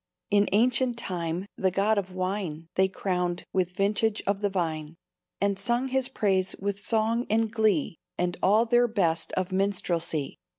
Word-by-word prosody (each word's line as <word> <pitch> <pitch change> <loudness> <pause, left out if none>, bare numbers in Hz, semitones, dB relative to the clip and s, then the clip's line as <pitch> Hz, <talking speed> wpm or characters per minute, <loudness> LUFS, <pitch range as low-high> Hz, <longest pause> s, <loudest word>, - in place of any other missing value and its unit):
"In 205 -1 +4
ancient 240 +3 +2
time 175 -4 -3
the 190 - +2
God 200 +3 +2
of 190 -1 -6
Wine 185 -4 -3
They 190 0 +3
crowned 180 -2 -2
with 185 -2 +1
vintage 205 +2 +1
of 200 0 0
the 205 -1 0
vine, 160 -4 -2 0.4
And 200 0 +1
sung 240 +6 0
his 265 -1 +1
praise 190 -3 +1
with 200 0 -2
song 225 +3 +1
and 220 0 +2
glee 205 -8 +1 0.2
And 180 0 0
all 215 +4 +4
their 240 +1 +4
best 170 -8 0
of 185 0 -1
minstrelsy. 175 -6 -1
195 Hz, 160 wpm, -27 LUFS, 180-220 Hz, 0.4 s, In